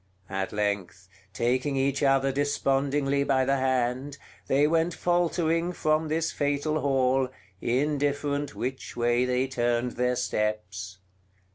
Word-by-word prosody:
At 95 0 -2
length, 100 -2 -2 0.2
taking 130 +6 0
each 135 +1 0
other 135 -1 +3
despondingly 140 0 +1
by 135 -2 +2
the 135 +1 +2
hand, 130 +1 0 0.3
they 140 +2 +3
went 165 +2 +1
faltering 175 -1 +1
from 155 -1 +1
this 160 +2 0
fatal 145 +2 0
hall, 135 -2 +2 0.3
indifferent 145 +2 0
which 130 0 -5
way 120 +1 +2
they 125 +1 +1
turned 120 -1 0
their 125 +1 0
steps. 105 -5 -2
135 Hz, 120 wpm, -27 LUFS, 125-145 Hz, 0.3 s, other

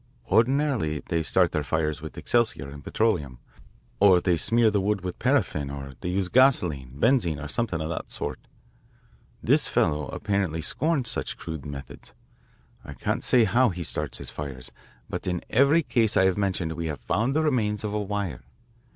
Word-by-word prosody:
Ordinarily 120 - +2
they 85 -2 +1
start 90 +2 +2
their 75 -3 -1
fires 75 0 -1
with - - -9
excelsior 120 - 0
and 70 +1 -10
petroleum, 85 - 0 0.6
or 95 -3 +6
they 90 -1 +2
smear 115 +6 +3
the 100 -1 +1
wood 100 0 0
with 90 -1 -6
paraffin 70 -2 +1
or 70 -1 -7
they 90 - -3
use 95 0 0
gasoline, 90 - +2
benzine, 110 - +2
or 75 - -6
something 90 +1 -1
of 80 0 -3
that 85 - -5
sort. - - -5 1.0
This - - +3
fellow 75 -1 +1
apparently 100 -6 -2
scorns 150 -4 0
such - - -2
crude 80 -3 -7
methods. 70 -3 -10 0.7
I - - -9
can't - - -2
say 125 -2 +5
how 120 +4 +3
he 90 -2 -5
starts - - -4
his - - -8
fires, 65 -3 -6 0.4
but - - -5
in 90 -1 -2
every 140 +7 +4
case 115 -6 +1
I 95 - +5
have 95 -1 +3
mentioned 95 -5 -1
we 80 0 -4
have 75 -2 -5
found 120 +6 0
the 155 - +2
remains 110 -8 0
of 105 -1 -3
a 105 - 0
wire. 100 -9 -3
95 Hz, 175 wpm, -26 LUFS, 75-115 Hz, 1.0 s, or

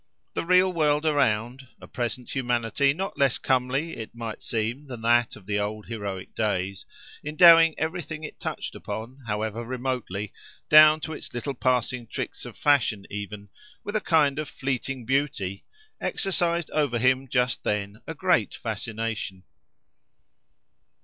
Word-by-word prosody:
The - - -2
real 185 +1 +5
world 150 -2 +2
around—a 130 -3 0
present 120 0 -4
humanity 125 +1 +1
not 190 +7 -4
less 140 -2 +3
comely, 130 +5 0
it 110 +1 -8
might 115 -2 -6
seem, 120 +6 -2
than 120 -4 -8
that 120 0 +3
of 95 - -15
the 105 +1 0
old 105 +1 -3
heroic 100 -5 -5
days—endowing 150 - +3
everything 160 -1 -3
it 155 - -8
touched - - -4
upon, 120 +5 -6
however 110 +2 -2
remotely, 120 -5 -3 0.4
down 155 +1 +8
to 160 - -4
its - - -8
little 135 +4 -3
passing 125 -1 0
tricks - - -5
of - - -10
fashion 125 -8 +2
even, 100 0 -6 0.3
with 205 - -5
a 215 - +2
kind 155 -5 +3
of 155 - -4
fleeting 135 -1 -3
beauty, 120 -8 -1 0.4
exercised 175 -4 0
over 145 -6 +1
him 130 +2 +2
just 125 -1 0
then 105 +1 -2
a 160 - -5
great 175 - +2
fascination. 110 -3 -4
125 Hz, 135 wpm, -26 LUFS, 110-150 Hz, 0.4 s, down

